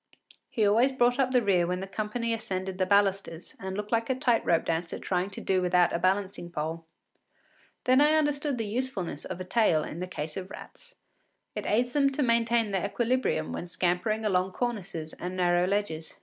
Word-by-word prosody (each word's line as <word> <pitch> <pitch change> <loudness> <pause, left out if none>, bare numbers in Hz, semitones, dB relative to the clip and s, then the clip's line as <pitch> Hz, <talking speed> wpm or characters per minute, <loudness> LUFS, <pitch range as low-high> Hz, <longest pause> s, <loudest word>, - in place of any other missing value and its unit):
He 220 - +1
always 235 +6 +4
brought 245 0 +2
up 265 -1 +3
the 250 -2 +2
rear 180 -4 +3
when 180 +1 -1
the 190 - -4
company 215 +4 -2
ascended 190 -4 -4
the 185 - +1
balusters, 195 -4 +1
and 190 0 -5
looked 210 0 -5
like 230 +1 +1
a 260 - +2
tight 245 -2 +2
rope 165 -1 +2
dancer 165 +1 -2
trying 185 +1 -1
to 200 - -8
do 190 -1 +1
without 180 -1 +3
a 170 - 0
balancing 190 -1 0
pole. 165 0 -4 1.0
Then 255 +2 +4
I 300 +1 +5
understood 295 -2 +1
the 225 - -2
usefulness 210 - -3
of - - -6
a - - -3
tail 180 -7 +3
in 165 - -6
the 180 - -3
case 155 -4 -5
of 190 0 -6
rats: - - -12 0.6
it - - -5
aids 245 +3 +1
them 280 -2 +3
to 290 - 0
maintain 230 -2 +2
their 195 0 0
equilibrium 235 - 0
when 175 - -5
scampering 180 +5 0
along 185 -2 +1
cornices 195 -10 -4
and 180 +1 -6
narrow 175 0 +2
ledges. 190 -5 -2
195 Hz, 195 wpm, -28 LUFS, 180-235 Hz, 1.0 s, I